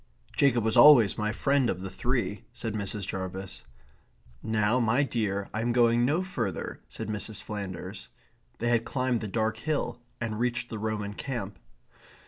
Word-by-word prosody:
"Jacob 125 -5 +3
was 110 0 +1
always 125 -9 +8
my 105 -1 -1
friend 135 +2 +2
of 90 - -2
the 95 - -4
three," 120 -1 -1
said 115 -2 -4
Mrs. 100 -1 -2
Jarvis. 95 0 -5 0.8
"Now, 110 +2 +2
my 120 +4 +3
dear, 105 -7 -1
I 110 - -1
am 120 +1 +1
going 120 0 +4
no 155 +8 +1
further," 120 - -3
said - - -6
Mrs. 105 -1 -2
Flanders. 95 -2 -6 0.5
They 120 - -1
had 120 -1 +3
climbed 125 -2 0
the 110 - -3
dark 110 +2 0
hill 120 -2 -2 0.2
and 110 -2 -3
reached 120 0 -1
the 110 - -5
Roman 105 -1 -2
camp. 105 -6 -5
110 Hz, 160 wpm, -28 LUFS, 105-120 Hz, 0.8 s, always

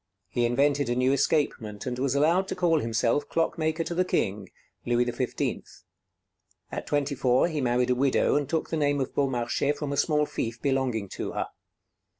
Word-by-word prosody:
He 120 +5 +1
invented 140 +2 +2
a 120 - +1
new 125 +1 +2
escapement, 135 -7 0
and 125 -1 -3
was 135 0 0
allowed 170 +7 +3
to - - -3
call 165 -3 +2
himself 115 +4 0
"Clockmaker 165 0 0
to 170 - -4
the 180 +2 +2
King" 100 - -1 0.3
Louis 120 0 +2
XV. 125 +1 -2 1.1
At - - -5
twenty 145 0 0
four 130 +2 +3
he 155 -4 -2
married 125 0 +1
a - - +3
widow, 135 +1 +2
and 145 -2 0
took 160 -1 -1
the 165 - 0
name 145 -1 +1
of 130 - -2
Beaumarchais 135 +1 0
from 145 -1 -3
a - - -3
small 150 -1 +2
fief 115 -4 -4
belonging 130 -6 0
to - - -5
her. - - -1
135 Hz, 180 wpm, -27 LUFS, 120-150 Hz, 1.1 s, allowed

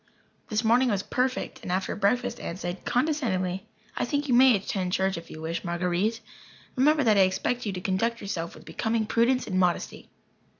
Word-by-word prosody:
This 215 0 0
morning 245 +3 +4
was 200 -3 0
perfect, 255 +1 -2
and - - -5
after 185 +1 -1
breakfast 235 +4 0
Aunt 170 - -5
said, 175 0 -5
condescendingly: 220 - 0 0.3
"I - - -1
think 285 +4 -1
you 255 - +1
may 255 0 +7
attend 185 -2 -2
church 190 0 +1
if 170 - -8
you 155 - -9
wish, 165 +1 -3
Marguer_ite_. 180 +5 -1 0.5
Remember 295 +3 +4
that 215 -4 +4
I - - +6
expect 215 +6 0
you 200 - -2
to 180 - -5
conduct 230 +5 0
yourself 170 -5 -4
with - - -14
becoming 220 0 -1
prudence 235 +4 +2
and 185 -3 -1
modesty." 180 -2 -1
210 Hz, 185 wpm, -27 LUFS, 185-245 Hz, 0.5 s, may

